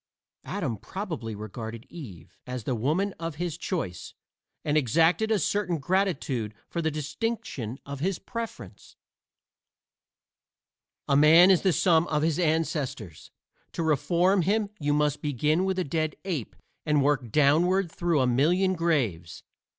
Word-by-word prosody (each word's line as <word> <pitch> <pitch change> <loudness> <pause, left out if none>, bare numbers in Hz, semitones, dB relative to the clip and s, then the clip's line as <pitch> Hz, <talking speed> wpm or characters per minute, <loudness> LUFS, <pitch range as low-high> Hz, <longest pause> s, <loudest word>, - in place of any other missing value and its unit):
Adam 150 - -3
probably 130 - -5
regarded 110 +2 -7
Eve 95 - -11
as 125 -2 -5
the 130 - -1
woman 155 - 0
of 165 -2 -4
his 170 0 -3
choice, 160 - -4 0.5
and 150 - +1
exacted 165 - +3
a 220 - +3
certain 200 -4 0
gratitude 140 - -1
for 170 - -3
the 160 - +1
distinction 145 - -4
of 140 -1 -6
his 185 +4 -1
preference. 230 -2 -8 2.1
A 140 - +3
man 160 +6 +7
is 185 - +4
the 190 - +3
sum 170 +1 +3
of 150 -1 0
his 160 0 +1
ancestors; 155 - -2 0.4
to 165 - -2
reform 175 +5 +2
him 205 +3 0
you 145 -1 0
must 150 0 +1
begin 150 +5 +1
with 190 -1 -1
a 185 - +1
dead 155 0 -2
ape 160 - -3 0.3
and 150 -2 +2
work 135 -5 +1
downward 165 - +3
through 170 -5 +1
a - - +3
million 170 +10 +2
graves. 130 - -1
155 Hz, 140 wpm, -27 LUFS, 135-180 Hz, 2.1 s, man